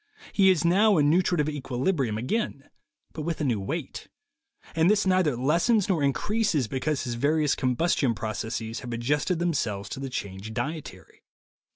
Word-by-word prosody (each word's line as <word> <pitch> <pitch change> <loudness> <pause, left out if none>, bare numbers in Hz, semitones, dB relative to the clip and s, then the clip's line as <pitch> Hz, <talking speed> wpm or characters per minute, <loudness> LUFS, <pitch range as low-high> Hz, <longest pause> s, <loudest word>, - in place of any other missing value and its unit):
He 195 -2 +5
is 175 -3 +2
now 200 +3 +4
in 145 -1 +4
nutritive 175 -3 +2
equilibrium 135 - -1
again, 140 - -2 0.5
but 155 - -5
with 165 +1 -3
a - - -1
new 120 -7 +1
weight; 135 - -5 0.7
and 165 +2 +4
this 210 -1 +3
neither 185 -7 +2
lessens 170 - +2
nor 180 -6 +1
increases 150 - +1
because 135 +4 -2
his 120 -2 -3
various 150 +4 +1
combus 130 +7 +1
tion 125 -5 +1
processes 110 +1 -4
have 120 -1 -6
adjusted 145 +9 0
themselves 115 - -1
to 130 - -6
the 135 0 -4
changed 100 -1 -6
dietary. 125 - -6
145 Hz, 160 wpm, -26 LUFS, 120-170 Hz, 0.7 s, He